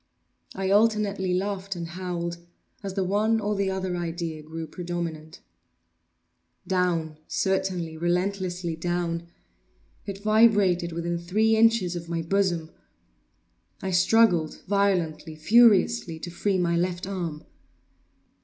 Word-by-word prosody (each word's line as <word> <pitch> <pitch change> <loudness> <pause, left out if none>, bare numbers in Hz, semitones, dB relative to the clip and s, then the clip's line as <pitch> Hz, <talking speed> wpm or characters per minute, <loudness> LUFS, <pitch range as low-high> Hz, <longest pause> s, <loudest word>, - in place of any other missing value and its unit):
I 190 0 -1
alternately 205 -3 +2
laughed 195 +1 -2
and 170 -1 -5
howled 170 -1 -4 0.4
as 195 -2 -5
the 195 - +1
one 210 +4 +1
or 210 0 -1
the 195 -1 0
other 190 -1 -2
idea 165 -2 -4
grew 160 +1 -6
predominant. 165 -2 -6 1.2
Down—certainly, 175 0 -1
relentlessly 180 0 -1
down! 170 0 -2 0.8
It 200 0 -6
vibrated 205 -5 +4
within 170 +1 -2
three 215 +6 +2
inches 220 -5 +3
of 170 -1 -6
my 165 -1 -2
bosom! 175 -3 0 1.1
I 190 - -2
struggled 185 -3 +3
violently, 175 -6 0
furiously, 210 0 +4
to 175 - -6
free 190 +2 0
my 170 -1 +1
left 175 +1 -1
arm. 175 -6 -4
180 Hz, 110 wpm, -26 LUFS, 170-200 Hz, 1.2 s, vibrated